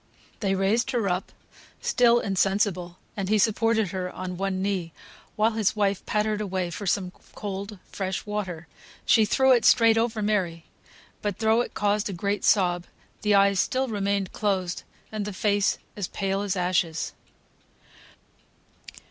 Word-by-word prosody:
They 195 Hz, -2 st, 0 dB
raised 200 Hz, +5 st, +1 dB
her 235 Hz, -5 st, 0 dB
up, 180 Hz, +1 st, -2 dB, 0.5 s
still 240 Hz, -1 st, +4 dB
insensible, 195 Hz, -3 st, 0 dB, 0.2 s
and 195 Hz, -2 st, -3 dB
he 215 Hz, -, +4 dB
supported 220 Hz, 0 st, +2 dB
her 185 Hz, 0 st, -3 dB
on 185 Hz, 0 st, -5 dB
one 195 Hz, 0 st, -2 dB
knee, 190 Hz, -4 st, -2 dB, 0.4 s
while 215 Hz, +2 st, +3 dB
his 220 Hz, -2 st, 0 dB
wife 200 Hz, -2 st, 0 dB
pattered 210 Hz, 0 st, 0 dB
away 185 Hz, -3 st, -2 dB
for 200 Hz, +3 st, -5 dB
some 185 Hz, 0 st, 0 dB, 0.2 s
cold 200 Hz, 0 st, -5 dB
fresh 190 Hz, +1 st, -3 dB
water. 190 Hz, -6 st, -4 dB, 0.4 s
She 220 Hz, -, +5 dB
threw 265 Hz, +5 st, +3 dB
it 245 Hz, -2 st, +5 dB
straight 225 Hz, -1 st, +5 dB
over 225 Hz, -2 st, -1 dB
Mary; 180 Hz, -6 st, -1 dB, 0.6 s
but 205 Hz, -3 st, -2 dB
though 220 Hz, +1 st, +3 dB
it -, -, -5 dB
caused 205 Hz, 0 st, +1 dB
a -, -, -4 dB
great 200 Hz, +3 st, -2 dB
sob, 175 Hz, -3 st, +3 dB, 0.4 s
the 210 Hz, -1 st, +3 dB
eyes 200 Hz, -1 st, +4 dB
still 260 Hz, +3 st, 0 dB
remained 200 Hz, -2 st, -1 dB
closed, 190 Hz, -4 st, -1 dB, 0.3 s
and 215 Hz, -1 st, -3 dB
the 205 Hz, 0 st, -5 dB
face 200 Hz, +1 st, +1 dB, 0.2 s
as 200 Hz, -3 st, -3 dB
pale 195 Hz, 0 st, -2 dB
as 200 Hz, -2 st, -1 dB
ashes. 175 Hz, -3 st, 0 dB
200 Hz, 150 wpm, -26 LUFS, 185-215 Hz, 0.6 s, She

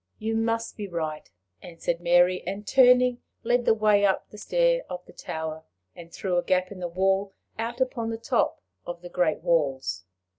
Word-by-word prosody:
"You 225 Hz, +1 st, -2 dB
must 225 Hz, 0 st, -1 dB
be 205 Hz, -2 st, -5 dB
right," 160 Hz, -4 st, -4 dB, 0.3 s
answered 170 Hz, 0 st, -4 dB
Mary, 175 Hz, +1 st, +4 dB
and, 200 Hz, +3 st, -4 dB
turning, 250 Hz, +2 st, +5 dB, 0.2 s
led 240 Hz, +1 st, +1 dB
the 220 Hz, -, +4 dB
way 210 Hz, -2 st, +3 dB
up 195 Hz, -1 st, +1 dB
the 210 Hz, -, -11 dB
stair -, -, +2 dB
of 180 Hz, 0 st, -6 dB
the -, -, -16 dB
tower, 160 Hz, 0 st, -5 dB, 0.3 s
and 170 Hz, -1 st, -12 dB
through 180 Hz, -1 st, -2 dB
a -, -, -3 dB
gap 185 Hz, 0 st, +1 dB
in 195 Hz, -, -8 dB
the 175 Hz, -, -3 dB
wall 195 Hz, +3 st, 0 dB, 0.3 s
out 235 Hz, +2 st, -3 dB
upon 245 Hz, -3 st, -1 dB
the 225 Hz, -, -3 dB
top 230 Hz, -, 0 dB, 0.2 s
of 175 Hz, 0 st, -7 dB
the 175 Hz, -, -8 dB
great 175 Hz, -3 st, 0 dB
walls. 135 Hz, -, 0 dB
190 Hz, 185 wpm, -26 LUFS, 175-225 Hz, 0.3 s, turning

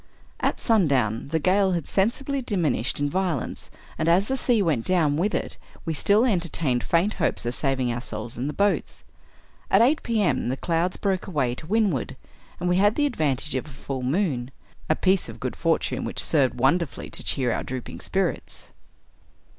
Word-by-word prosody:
At -, -, 0 dB
sundown, 140 Hz, -, +2 dB
the 160 Hz, +3 st, 0 dB
gale 190 Hz, +4 st, +3 dB
had 170 Hz, -4 st, -2 dB
sensibly 270 Hz, +7 st, 0 dB
diminished 170 Hz, -, -1 dB
in 145 Hz, -, +1 dB
vio 185 Hz, +2 st, 0 dB
lence, -, -, -6 dB, 0.3 s
and, 160 Hz, +1 st, +2 dB
as 185 Hz, +6 st, +3 dB
the 265 Hz, -, +1 dB
sea 245 Hz, -3 st, +2 dB
went 150 Hz, -10 st, +1 dB
down 160 Hz, -4 st, +2 dB
with 190 Hz, +7 st, 0 dB
it, -, -, -4 dB, 0.3 s
we 165 Hz, -, -1 dB
still 205 Hz, -, +3 dB
enter 180 Hz, -8 st, +1 dB
tained 130 Hz, -8 st, 0 dB
faint 175 Hz, -, +1 dB
hopes 170 Hz, -, -1 dB
of 120 Hz, -, -1 dB
saving 130 Hz, -3 st, +1 dB
ourselves 120 Hz, -1 st, -5 dB
in 125 Hz, +4 st, -3 dB
the -, -, -1 dB
boats. 200 Hz, +5 st, 0 dB, 0.7 s
At 195 Hz, +4 st, +5 dB
eight 290 Hz, +6 st, +3 dB
P. 230 Hz, -2 st, -1 dB
M., 170 Hz, -, +1 dB
the 130 Hz, -, -2 dB
clouds 170 Hz, +3 st, 0 dB
broke 195 Hz, -3 st, -1 dB
away 140 Hz, -9 st, 0 dB
to 125 Hz, +5 st, -9 dB
windward, 200 Hz, -, 0 dB, 0.4 s
and 180 Hz, -, -2 dB
we 180 Hz, 0 st, +3 dB
had 205 Hz, +2 st, +4 dB
the 295 Hz, -, +2 dB
advantage 150 Hz, -, -1 dB
of 130 Hz, +3 st, -2 dB
a -, -, -10 dB
full 135 Hz, -1 st, -6 dB
moon 130 Hz, -3 st, 0 dB, 0.2 s
— -, -, -27 dB
a 155 Hz, -, +4 dB
piece 190 Hz, +2 st, +1 dB
of -, -, -10 dB
good -, -, -3 dB
for -, -, +2 dB
tune -, -, -3 dB
which -, -, -5 dB
served 140 Hz, -5 st, +2 dB
wonderfully 135 Hz, +5 st, 0 dB
to -, -, -5 dB
cheer 130 Hz, -3 st, 0 dB
our -, -, -2 dB
drooping 130 Hz, -2 st, -6 dB
spirits. -, -, -3 dB
165 Hz, 195 wpm, -25 LUFS, 135-195 Hz, 0.7 s, At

